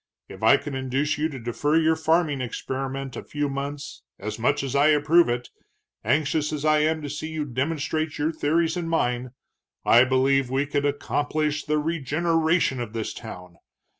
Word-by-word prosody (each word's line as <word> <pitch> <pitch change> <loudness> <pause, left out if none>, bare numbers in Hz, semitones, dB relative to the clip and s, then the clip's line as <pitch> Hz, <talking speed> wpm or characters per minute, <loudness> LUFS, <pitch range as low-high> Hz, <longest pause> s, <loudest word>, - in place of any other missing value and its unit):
If - - -11
I - - +6
could 145 - -7
induce 135 +3 -1
you 155 +1 +1
to 140 - -7
defer 120 +6 -1
your 160 0 +3
farming 160 -3 +1
experiment 135 +2 -4
a - - -6
few 145 0 -2
months, 140 +1 -5 0.2
as 105 +3 -5
much 120 - +1
as 135 0 -3
I 140 +2 +5
approve 155 +2 +4
it, 120 0 -3 0.5
anxious 150 +1 +1
as 150 -1 -3
I 155 0 +4
am 155 +1 +1
to - - -4
see 150 +2 -5
you 155 -2 -3
demonstrate 150 +3 -2
your 150 +2 0
theories 160 +1 +1
and 170 -2 -3
mine, 125 -6 -1 0.5
I 120 +2 +7
believe 130 0 +2
we 135 +2 0
could 145 0 0
accomplish 145 +1 -1
the 150 0 +1
regeneration 160 0 +1
of 115 -2 -6
this 115 -2 -3
town. 90 -6 -10
145 Hz, 175 wpm, -25 LUFS, 130-155 Hz, 0.5 s, I